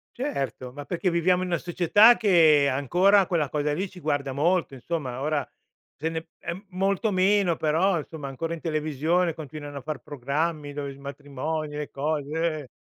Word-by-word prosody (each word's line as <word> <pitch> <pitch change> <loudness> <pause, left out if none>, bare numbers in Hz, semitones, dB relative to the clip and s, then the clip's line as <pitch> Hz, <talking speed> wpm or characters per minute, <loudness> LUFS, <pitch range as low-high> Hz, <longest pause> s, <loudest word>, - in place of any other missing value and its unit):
Certo, 140 - -3
ma 145 0 -8
perché 180 +1 -1
viviamo 180 +2 +2
in 185 - -2
una 170 -1 0
società, 205 +7 +5
che 160 -9 +5
ancora 180 +9 +4
quella 160 -6 0
cosa 150 0 0
lì 190 +4 -2
ci 185 - -13
guarda 140 -4 -1
molto, 160 +1 +1
insomma. 130 -2 -4
Ora 150 0 0 0.5
se 160 - -2
ne 160 0 -3
p 170 +4 -8
molto 195 +3 0
meno, 190 -2 +3
però 165 +4 +2
insomma 150 -2 -6
ancora 165 +5 -4
in 165 - -7
televisione 155 +2 0
continuano 145 -2 -7
a - - -12
far 150 0 -5
programmi, 145 +2 -2
dove 140 -1 -5
s - - -15
matrimoni, 145 +2 -5
le 150 - -4
cose, 155 +2 -1
eh. 130 - -12
155 Hz, 175 wpm, -26 LUFS, 145-180 Hz, 0.5 s, società